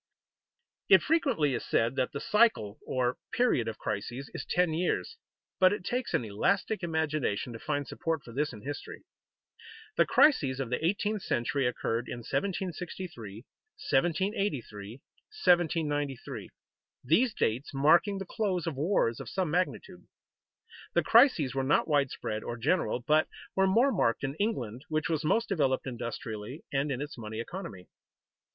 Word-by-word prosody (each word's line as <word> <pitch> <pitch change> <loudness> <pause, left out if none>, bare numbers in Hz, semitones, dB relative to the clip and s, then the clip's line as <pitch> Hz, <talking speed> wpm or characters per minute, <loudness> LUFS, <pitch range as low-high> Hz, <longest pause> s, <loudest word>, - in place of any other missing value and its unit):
_ - - -64 0.9
It 190 -2 +7
frequently 270 - +2
is 120 - -2
said 115 +3 +1
that 130 -2 0
the 140 - -4
cycle, 210 - +2
or 125 -1 0 0.2
period, 240 - +2
of 110 - -4
crises 120 +6 -4
is - - -4
ten 180 -2 +2
years, 180 - -1 0.4
but 185 0 +6
it 205 -3 -3
takes 250 +4 -1
an 120 - 0
elastic 195 - 0
imagination 155 - -1
to 115 - -8
find 145 0 -2
support 165 -1 -2
for 120 - -11
this 145 +5 -1
in 110 -4 -11
history. 145 +2 -7 0.9
The - - +4
crises 140 - +4
of 130 -3 -3
the 125 - -1
eighteenth 205 +4 0
century 125 0 0
occurred 120 -1 -2
in 120 - -5
1763, 175 - -4 0.6
1783, 150 - 0 0.5
1793, 150 -6 +1 0.5
these 215 - +3
dates 120 +6 -1
marking 165 +8 +4
the 195 - -5
close 185 -3 -1
of 165 - -2
wars 145 - +1
of - - -7
some 185 -5 -1
magnitude. 180 - -2 0.9
The - - +4
crises 225 - +5
were 135 - 0
not 140 +3 +2
widespread 140 -7 0
or 120 - -5
general, 145 0 +1
but 155 +5 +3 0.3
were 190 0 +4
more 235 +8 +4
marked 115 - +1
in 135 -1 -1
England, 130 - -2
which 155 +1 -1
was 160 -2 0
most 225 +9 +2
developed 140 -9 +1
industrially 120 +1 -6
and 140 +1 0
in 130 0 -2
its 145 -4 -8
money 110 0 -6
economy. 115 - -7
150 Hz, 150 wpm, -30 LUFS, 125-185 Hz, 0.9 s, It